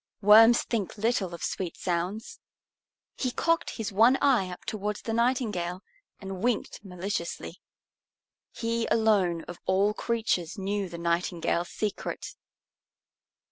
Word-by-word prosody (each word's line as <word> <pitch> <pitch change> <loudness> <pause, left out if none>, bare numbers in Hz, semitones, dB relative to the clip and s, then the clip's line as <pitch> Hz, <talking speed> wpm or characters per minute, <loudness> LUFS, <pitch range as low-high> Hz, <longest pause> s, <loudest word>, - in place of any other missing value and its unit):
Worms 225 +3 +8
think 220 -5 -3
little 215 -4 0
of - - -9
sweet 180 -3 -3
sounds. 190 - -3 0.8
He 255 - 0
cocked 330 +6 0
his 220 -3 -3
one 230 +7 +5
eye 245 -10 +3
up 180 - -9
towards 210 -1 -3
the 225 - -3
Nightingale 220 -7 0 0.4
and 190 -2 -6
winked 235 -3 -1
maliciously. 180 -2 -5 0.9
He 230 0 -2
alone 200 -7 +2
of 175 - -9
all 195 +3 +3
creatures 220 -6 -1
knew 195 0 -2
the 170 - -7
Nightingale's 170 0 -1
secret. 210 -2 -4
205 Hz, 120 wpm, -28 LUFS, 180-230 Hz, 0.9 s, Worms